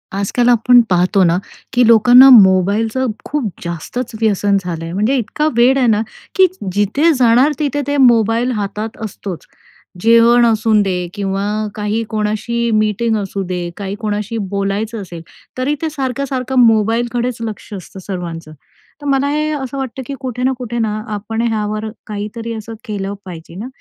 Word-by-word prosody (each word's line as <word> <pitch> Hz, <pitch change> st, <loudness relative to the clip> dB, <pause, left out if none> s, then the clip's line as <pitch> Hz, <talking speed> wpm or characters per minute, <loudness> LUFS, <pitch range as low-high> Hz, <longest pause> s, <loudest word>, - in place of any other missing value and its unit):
आजकाल 220 Hz, +5 st, +1 dB
आपण 245 Hz, +1 st, +5 dB
पाहतो 185 Hz, +2 st, +3 dB
ना, 170 Hz, 0 st, +3 dB, 0.4 s
की 245 Hz, -, +4 dB
लोकांना 245 Hz, +4 st, +8 dB
मोबाईलचं 215 Hz, +3 st, +4 dB, 0.2 s
खूप 285 Hz, -7 st, -2 dB
जास्तच 170 Hz, +8 st, -5 dB
व्यसन 205 Hz, -2 st, +2 dB
झालं 170 Hz, -2 st, -5 dB
आहे, 165 Hz, +1 st, -6 dB
म्हणजे 215 Hz, +8 st, +1 dB
इतका 300 Hz, +7 st, -1 dB
वेड 250 Hz, +3 st, +5 dB
आहे 255 Hz, -2 st, +2 dB
ना, 215 Hz, -1 st, +3 dB, 0.3 s
की 380 Hz, -1 st, +6 dB, 0.3 s
जिथे 215 Hz, -, +2 dB
जाणार 250 Hz, +2 st, +4 dB
तिथे 290 Hz, -1 st, -1 dB
ते 285 Hz, 0 st, 0 dB
मोबाईल 235 Hz, -1 st, +3 dB
हातात 210 Hz, +2 st, -4 dB
असतोच. 195 Hz, -3 st, -7 dB, 0.6 s
जेवण 230 Hz, +2 st, +5 dB
असून 220 Hz, -1 st, +3 dB
दे 180 Hz, -3 st, -2 dB
किंवा 195 Hz, -1 st, -2 dB, 0.3 s
काही 210 Hz, +2 st, -2 dB
कोणाशी 220 Hz, +2 st, -1 dB
मीटिंग 215 Hz, +1 st, +1 dB
असू 200 Hz, -1 st, -4 dB
दे, 180 Hz, -1 st, -4 dB
काही 200 Hz, -1 st, -4 dB
कोणाशी 210 Hz, +1 st, -3 dB
बोलायचं 200 Hz, +3 st, -2 dB
असेल, 175 Hz, -3 st, -9 dB, 0.4 s
तरी 265 Hz, +4 st, 0 dB
ते 320 Hz, -, -1 dB
सारखं-सारखं 265 Hz, -2 st, -2 dB
मोबालकडेच 235 Hz, +2 st, +1 dB
लक्ष 220 Hz, -2 st, -6 dB
असतं 190 Hz, 0 st, -9 dB
सर्वांचं. 170 Hz, -4 st, -6 dB, 0.5 s
तर -, -, -10 dB
मला 275 Hz, 0 st, +1 dB
हे 305 Hz, +1 st, 0 dB
असं 275 Hz, -2 st, -4 dB
वाटतं 265 Hz, 0 st, -5 dB
की 280 Hz, -, -5 dB
कुठे 250 Hz, -2 st, -4 dB
ना 260 Hz, -, +2 dB
कुठे 240 Hz, -2 st, -5 dB
ना, 220 Hz, -2 st, 0 dB, 0.2 s
आपण 220 Hz, +2 st, -3 dB
ह्यावर 215 Hz, -1 st, -2 dB, 0.2 s
काहीतरी 215 Hz, +2 st, -5 dB
असं 225 Hz, 0 st, -7 dB
केलं 200 Hz, -3 st, -4 dB
पाहिजे 170 Hz, -2 st, -10 dB
ना, 210 Hz, +6 st, -6 dB
220 Hz, 155 wpm, -16 LUFS, 200-250 Hz, 0.6 s, लोकांना